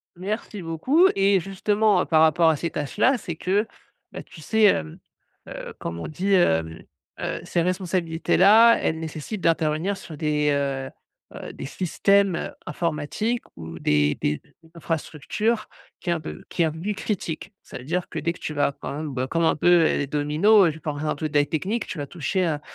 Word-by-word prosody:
merci 205 Hz, +2 st, -5 dB
beaucoup, 255 Hz, -, +3 dB
et 195 Hz, 0 st, +4 dB
justement, 200 Hz, +1 st, +1 dB
par 160 Hz, -1 st, +3 dB
rapport 160 Hz, +1 st, +5 dB
à 160 Hz, -, +3 dB
ces 170 Hz, +3 st, -3 dB
tâches 145 Hz, -2 st, -5 dB
là, 265 Hz, 0 st, +4 dB
c'est 175 Hz, -7 st, -6 dB
que, 200 Hz, +6 st, 0 dB, 0.4 s
beh, -, -, -7 dB
tu 160 Hz, -, -14 dB
sais, 220 Hz, +7 st, +1 dB
hem, 80 Hz, -, +2 dB, 0.5 s
heu, -, -, -8 dB
comme 85 Hz, 0 st, -5 dB
on -, -, -5 dB
dit, 190 Hz, +6 st, -1 dB
hem, 80 Hz, -, +2 dB, 0.4 s
heu, -, -, -3 dB
ces 170 Hz, -, 0 dB
responsabilités 180 Hz, -2 st, -1 dB
là, 225 Hz, +5 st, +7 dB
elles 160 Hz, 0 st, -1 dB
nécessitent 160 Hz, +6 st, -6 dB
d'intervenir 165 Hz, +4 st, +1 dB
sur 155 Hz, -5 st, -10 dB
des, 150 Hz, -1 st, +1 dB
heu 140 Hz, -2 st, -1 dB, 0.5 s
heu, -, -, -8 dB
des -, -, -7 dB
systèmes, 190 Hz, +4 st, +2 dB
heu, -, -, -3 dB, 0.2 s
informatiques 170 Hz, +10 st, -2 dB
ou 80 Hz, 0 st, -8 dB
des 75 Hz, -1 st, +2 dB
des 75 Hz, 0 st, -1 dB
des -, -, -28 dB, 0.2 s
infrastructures 170 Hz, +7 st, -2 dB, 0.3 s
qui 180 Hz, -, -4 dB
est 170 Hz, -, +3 dB
un 170 Hz, -, -2 dB
peu 155 Hz, -, -8 dB
qui 170 Hz, -, 0 dB
est -, -, +4 dB
un 160 Hz, -, 0 dB
peu 160 Hz, -, -9 dB
plus 205 Hz, +2 st, -2 dB
critique. 195 Hz, -4 st, -4 dB
Ça -, -, -9 dB
veut 125 Hz, -, -10 dB
dire 175 Hz, +6 st, -2 dB
que, -, -, -7 dB
dès 170 Hz, -, -1 dB
que -, -, -16 dB
tu 150 Hz, -, -5 dB
vas 145 Hz, -1 st, +1 dB
quand -, -, -5 dB
même, 150 Hz, -1 st, -5 dB
bah, 130 Hz, 0 st, -2 dB
comme 165 Hz, +2 st, 0 dB
un -, -, +3 dB
peu 175 Hz, +2 st, +4 dB
les 145 Hz, -2 st, +1 dB
dominos, 160 Hz, +7 st, +4 dB
je 160 Hz, -, -11 dB
pense 145 Hz, -2 st, -4 dB
à -, -, -3 dB
un -, -, 0 dB
truc 155 Hz, +1 st, -4 dB
très 145 Hz, -1 st, +3 dB
technique, 195 Hz, +10 st, -2 dB
tu 175 Hz, -, -6 dB
vas 145 Hz, -, -4 dB
toucher 175 Hz, +5 st, -1 dB
à 150 Hz, -3 st, -1 dB
165 Hz, 205 wpm, -24 LUFS, 150-195 Hz, 0.5 s, là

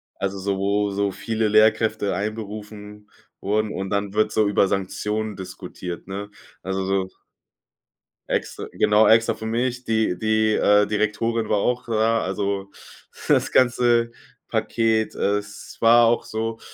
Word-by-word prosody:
also 100 Hz, 0 st, -3 dB
so, 100 Hz, 0 st, -2 dB
wo 100 Hz, +1 st, 0 dB
so 100 Hz, 0 st, -1 dB
viele 110 Hz, +3 st, -2 dB
Lehrkräfte 110 Hz, 0 st, +3 dB
einberufen 105 Hz, 0 st, -7 dB, 0.3 s
wurden, 105 Hz, +1 st, 0 dB
und 95 Hz, -1 st, -5 dB
dann 100 Hz, -1 st, -1 dB
wird 110 Hz, 0 st, +2 dB
so 110 Hz, -1 st, +2 dB
über 100 Hz, -1 st, +3 dB
Sanktionen 105 Hz, +3 st, -2 dB
diskutiert, 90 Hz, -2 st, -8 dB
ne? 100 Hz, +1 st, -6 dB, 0.3 s
Also 95 Hz, +1 st, -2 dB
so 95 Hz, 0 st, 0 dB, 1.2 s
Extra -, -, -3 dB
genau, 105 Hz, +1 st, +4 dB
extra 115 Hz, 0 st, +4 dB
für 110 Hz, -, -8 dB
mich. 125 Hz, +2 st, -2 dB
Die 110 Hz, -5 st, 0 dB
die, 110 Hz, 0 st, +2 dB
äh, 105 Hz, 0 st, +4 dB
Direktorin 110 Hz, +2 st, -1 dB
war 105 Hz, -, +1 dB
auch 125 Hz, +4 st, -1 dB
da, 115 Hz, 0 st, +1 dB
also 100 Hz, +1 st, -2 dB, 0.6 s
das -, -, +2 dB
ganze 120 Hz, -2 st, +3 dB, 0.4 s
Paket. 110 Hz, -1 st, 0 dB
Es 105 Hz, +1 st, -3 dB
war 115 Hz, +1 st, +6 dB
auch 120 Hz, +1 st, +1 dB
so 115 Hz, +1 st, -4 dB
105 Hz, 135 wpm, -23 LUFS, 100-110 Hz, 1.2 s, war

